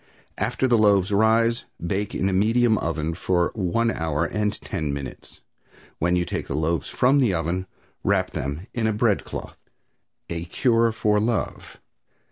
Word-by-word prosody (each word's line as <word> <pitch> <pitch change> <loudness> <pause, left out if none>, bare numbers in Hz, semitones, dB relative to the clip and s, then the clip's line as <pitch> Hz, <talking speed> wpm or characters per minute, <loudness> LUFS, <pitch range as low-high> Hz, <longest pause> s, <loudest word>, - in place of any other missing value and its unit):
After 130 - 0
the 120 -3 +3
loaves 100 -2 +4
rise 115 +3 +3
bake 95 +4 -2
in 95 - 0
a 95 - 0
medium 110 +3 +3
oven 80 -1 -2
for 90 +1 0
one 115 +4 0
hour 80 -2 -1
and 105 +3 -1
ten 75 -2 -3
minutes. 70 -1 -7 0.6
When 85 +2 +2
you 90 0 +1
take - - -4
the 70 - -3
loaves 80 0 -1
from 135 +3 +3
the 115 -9 +3
oven 85 +3 -2 0.4
wrap - - +1
them 70 +6 -4
in 115 -2 0
a 110 - +1
bread 105 -1 +1
cloth." - - -8 0.7
A 85 0 -4
CURE 115 +5 +2
FOR 105 -2 +1
LOVE. 110 -1 -2
100 Hz, 160 wpm, -24 LUFS, 85-115 Hz, 0.7 s, loaves